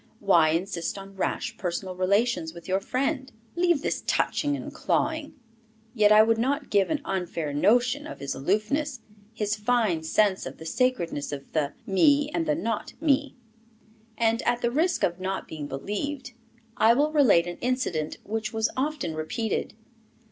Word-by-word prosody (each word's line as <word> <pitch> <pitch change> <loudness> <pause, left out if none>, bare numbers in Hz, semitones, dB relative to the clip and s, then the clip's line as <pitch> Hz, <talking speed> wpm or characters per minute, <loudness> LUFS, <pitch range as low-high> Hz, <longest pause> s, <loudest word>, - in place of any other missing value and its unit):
"Why 170 -6 +4
insist 170 +2 -2
on 195 0 -10
rash 235 +4 -2
personal 185 +1 -3
relations 185 -2 +1
with 170 - -11
your 190 +1 +1
friend?" 265 +5 -2 0.2
"Leave 345 -4 +2
this - - -2
touching 290 -1 +1
and - - -7
clawing." 315 -2 -1 0.6
Yet 210 -3 +4
I 215 0 +8
would 225 0 +2
not 275 +4 -1
give 200 -2 +3
an 310 -3 -1
unfair 170 -5 -3
notion 245 - +2
of - - -8
his 140 - -3
aloofness, 215 - -1 0.3
his 210 -2 -1
fine 215 -6 +1
sense 190 +4 +1
of - - -9
the 160 - -10
sacredness 170 - -1
of 140 -1 -7
the 150 -2 0
me 290 +8 +3
and 330 -2 -1
the 300 - +2
not 230 -8 -3
me. 285 -2 +1 0.8
And, 230 +1 +2
at 240 0 0
the 235 - +2
risk 335 +7 +1
of 175 +1 +1
not 190 +1 -3
being 150 -2 -6
believed, 245 - -4 0.4
I 225 +2 +5
will 295 +3 +2
relate 255 - +5
an 175 0 -6
incident, 240 - -1
which 220 +1 -3
was 220 0 0
often 275 - -2
repeated. 200 +11 -3
220 Hz, 160 wpm, -26 LUFS, 180-270 Hz, 0.8 s, I